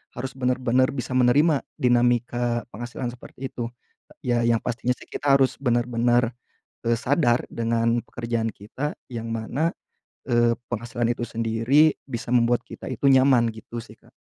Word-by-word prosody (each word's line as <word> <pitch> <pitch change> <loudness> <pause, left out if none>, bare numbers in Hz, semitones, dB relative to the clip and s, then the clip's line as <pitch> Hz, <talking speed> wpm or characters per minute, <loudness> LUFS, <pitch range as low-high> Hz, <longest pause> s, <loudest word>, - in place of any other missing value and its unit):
harus 130 +2 -5
bener-bener 125 0 +2
bisa 130 -1 -4
menerima 140 +4 +4 0.2
dinamika 120 -1 +1
penghasilan 120 +3 -5
seperti 125 +2 -8
itu. 115 -1 -4 0.6
Ya 120 -1 +2
yang 115 -1 +3
pastinya 120 +1 -1
sih - - -14
kita 140 -1 +2
harus 135 -1 +3
bener-bener, 120 -1 +2 0.5
eee, 115 - +4
sadar 130 -3 +2
dengan 115 0 +1
pekerjaan 115 -1 -2
kita 130 +9 -5 0.2
yang 115 -1 -5
mana, 125 +9 -1 0.6
eee, 120 -1 +4 0.2
penghasilan 120 0 -2
itu 120 - -3
sendiri 115 +7 +3
bisa 120 -3 -5
membuat 120 0 +3
kita - - -8
itu 130 +3 -1
nyaman 130 -3 +5
gitu 110 +2 -9
sih 115 - -15
Kak. - - -24
120 Hz, 145 wpm, -24 LUFS, 115-130 Hz, 0.6 s, nyaman